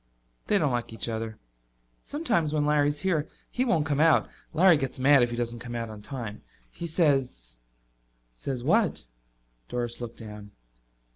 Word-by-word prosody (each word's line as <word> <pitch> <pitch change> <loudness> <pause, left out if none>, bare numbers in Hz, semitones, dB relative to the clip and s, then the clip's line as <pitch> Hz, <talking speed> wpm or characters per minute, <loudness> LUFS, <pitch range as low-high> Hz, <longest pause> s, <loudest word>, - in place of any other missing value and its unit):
"They 205 - +4
don't 150 -7 +2
like 120 -2 -2
each 115 - -3
other. 110 -1 -4 0.6
Sometimes 215 - 0
when 150 -1 +2
Larry's 145 0 +2
here 165 -5 +1 0.2
he 250 - +1
won't 170 - +2
come 145 -2 0
out. 160 0 +5 0.2
Larry 175 +2 +6
gets 135 -2 -2
mad 140 +1 +6
if 120 - +3
he 120 - -3
doesn't 120 0 -2
come 120 0 -6
out 115 -1 -3
on 105 -1 -9
time. 115 -4 -6 0.3
He 170 - -5
says 135 - +1 0.4
" - - -43
"Says 130 -3 -3
what?" 215 - +2 0.7
Doris 120 -1 -3
looked 120 -1 -6
down. 105 -2 -10
130 Hz, 165 wpm, -27 LUFS, 115-155 Hz, 0.7 s, Larry